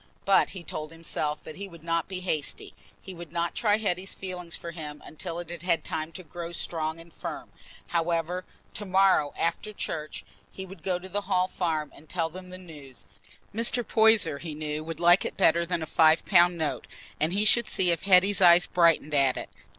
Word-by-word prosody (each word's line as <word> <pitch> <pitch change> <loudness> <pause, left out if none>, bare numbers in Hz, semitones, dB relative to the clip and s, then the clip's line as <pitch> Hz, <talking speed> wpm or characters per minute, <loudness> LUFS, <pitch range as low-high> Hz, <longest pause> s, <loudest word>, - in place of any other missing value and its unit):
But 195 - +4
he 185 -3 -9
told 155 -1 -6
himself 155 -2 -2
that 155 - -9
he 200 +1 -5
would 170 -4 -14
not 165 0 -1
be 185 -1 -5
hasty—he 180 +2 -5
would 170 -3 -10
not 170 0 -1
try 210 -3 +2
Hetty's 195 -3 -2
feeling 180 -2 -7
for 170 0 -5
him 150 -3 -7
until 165 +2 -6
it 175 -1 -6
had 175 - -5
had 175 -2 +1
time 155 0 -4
to 185 - -9
grow 170 +1 -7
strong 160 -1 -2
and 165 -1 -14
firm. - - -7 0.4
However, 170 +1 -1 0.3
tomorrow, 190 -6 +3
after 190 +6 -2
church, 155 -6 -5 0.3
he 190 - -7
would 190 -2 -12
go 185 0 -1
to 180 +1 -10
the 200 0 -4
Hall 185 -1 +3
Farm 160 -6 -2
and 155 - -17
tell 165 -3 -1
them 185 +1 -10
the 185 - -8
news. 150 -8 -12 0.5
Mr. 230 +2 0
Poyser, 220 -10 +4
he 160 -3 -6
knew, 150 0 -4
would 165 0 -6
like 175 +2 +6
it - - -5
better 170 -2 +3
than 170 -2 -1
a - - -3
five 160 0 +4
pound 175 -2 +5
note, 155 -2 -3 0.3
and 155 +2 +1
he 205 +3 +1
should 235 +1 +4
see 180 -2 +1
if 170 - -1
Hetty's 195 0 +4
eyes 175 0 +7
brightened 165 -3 +3
at 135 -3 +3
it. - - -6
170 Hz, 200 wpm, -27 LUFS, 160-185 Hz, 0.5 s, eyes